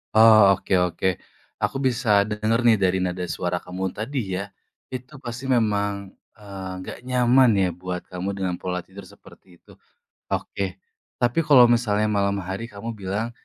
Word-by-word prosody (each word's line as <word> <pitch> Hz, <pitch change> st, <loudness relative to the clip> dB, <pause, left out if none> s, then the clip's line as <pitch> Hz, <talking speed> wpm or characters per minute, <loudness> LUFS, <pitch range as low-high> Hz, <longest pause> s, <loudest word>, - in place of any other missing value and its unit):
Oh, 110 Hz, -3 st, +7 dB
oke 95 Hz, -, -15 dB
oke. 90 Hz, +1 st, 0 dB, 0.5 s
Aku 135 Hz, -, -1 dB
bisa 115 Hz, -5 st, +3 dB
denger 110 Hz, +2 st, 0 dB
nih 115 Hz, -2 st, +5 dB
dari 95 Hz, -1 st, +2 dB
nada 90 Hz, 0 st, -2 dB
suara 90 Hz, +1 st, -2 dB
kamu 95 Hz, +1 st, -4 dB
tadi 110 Hz, -5 st, -3 dB
ya, 100 Hz, -, -5 dB, 0.5 s
itu 130 Hz, +3 st, -7 dB
pasti 120 Hz, 0 st, -7 dB
memang, 100 Hz, -4 st, 0 dB, 0.3 s
eee, 100 Hz, -2 st, -8 dB
enggak 95 Hz, -, -7 dB
nyaman 125 Hz, 0 st, +4 dB
ya 95 Hz, -, +3 dB
buat 90 Hz, 0 st, -5 dB
kamu 90 Hz, +2 st, -4 dB
dengan 95 Hz, -2 st, -2 dB
pola 90 Hz, 0 st, -4 dB
tidur 95 Hz, +2 st, -12 dB
seperti 90 Hz, -2 st, -18 dB
itu. -, -, -19 dB, 0.6 s
Oke, 95 Hz, -1 st, -3 dB, 0.4 s
tapi 120 Hz, +5 st, +1 dB
kalau 140 Hz, -6 st, +7 dB
misalnya 110 Hz, -3 st, +2 dB
malam 100 Hz, -1 st, +1 dB
hari 95 Hz, +6 st, -5 dB
kamu 105 Hz, +2 st, -6 dB
bilang 105 Hz, +3 st, -3 dB
100 Hz, 155 wpm, -23 LUFS, 95-115 Hz, 0.6 s, Oh